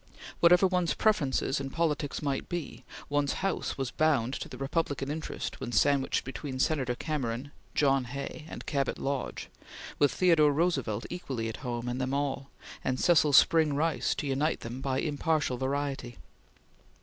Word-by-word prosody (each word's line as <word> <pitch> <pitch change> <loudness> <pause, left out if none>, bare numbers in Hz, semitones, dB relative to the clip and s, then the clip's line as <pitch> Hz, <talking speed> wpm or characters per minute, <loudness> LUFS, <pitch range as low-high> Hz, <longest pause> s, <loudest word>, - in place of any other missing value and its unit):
Whatever 180 +2 +6
one's 180 -2 +1
preferences 150 -9 +1
in 135 0 -4
politics 150 -1 -1
might 140 -2 -2
be, 175 -4 -5 0.2
one's 145 -1 +1
house 195 - -1
was 135 -2 -2
bound 140 -6 +2
to - - -5
the - - -8
Republican 140 -1 -1
interest 155 +1 -5
when - - -4
sandwiched 135 +4 +2
between 135 0 -5
Senator 130 -3 +1
Cameron, 135 -2 -3 0.2
John 135 -3 +3
Hay, 140 +4 -6
and - - -8
Cabot 140 -3 -1
Lodge, 140 -1 -3 0.5
with 145 - +4
Theodore 165 -5 +4
Roosevelt 135 - 0
equally 130 -10 -3
at 110 - -6
home 120 -1 -4
in 125 +1 -2
them 130 +1 -1
all, 140 -1 -2 0.3
and 130 0 -1
Cecil 155 -4 +4
Spring 155 0 +5
Rice 160 +2 +1
to - - -3
unite 140 +3 0
them 120 +3 -6
by 135 -1 -1
impartial 150 -3 0
variety. 135 -2 -2
140 Hz, 155 wpm, -29 LUFS, 130-155 Hz, 0.5 s, Whatever